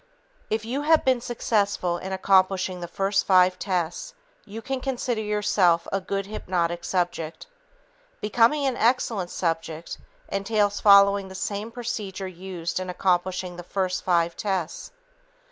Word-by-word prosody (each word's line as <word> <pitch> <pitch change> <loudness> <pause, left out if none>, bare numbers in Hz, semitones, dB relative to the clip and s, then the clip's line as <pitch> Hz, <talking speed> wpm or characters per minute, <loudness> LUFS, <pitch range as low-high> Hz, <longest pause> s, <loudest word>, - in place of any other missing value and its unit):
If 220 0 -1
you 260 +5 -2
have 315 +1 +3
been 260 -2 +3
successful 205 -7 0
in 190 - -6
accomplishing 190 -1 +2
the 175 - -4
first 195 +3 0
five 185 -1 +4
tests, 185 - -2 0.3
you 215 +2 -8
can 265 +3 -4
consider 250 -3 -2
yourself 205 -5 +2
a 195 - 0
good 195 +1 -3
hypnotic 175 -4 -2
subject. 175 -3 -2 0.7
Becoming 235 +7 +2
an 260 -2 0
excellent 225 -5 +1
subject 165 -2 -3 0.3
entails 205 0 0
following 200 -1 +6
the 190 - -10
same 205 +3 -3
procedure 215 -5 -5
used 180 -1 -5
in 185 0 -5
accomplishing 180 0 -1
the 175 - -7
first 185 0 -2
five 170 -2 +1
tests. 190 -5 -3
195 Hz, 135 wpm, -25 LUFS, 180-215 Hz, 0.7 s, following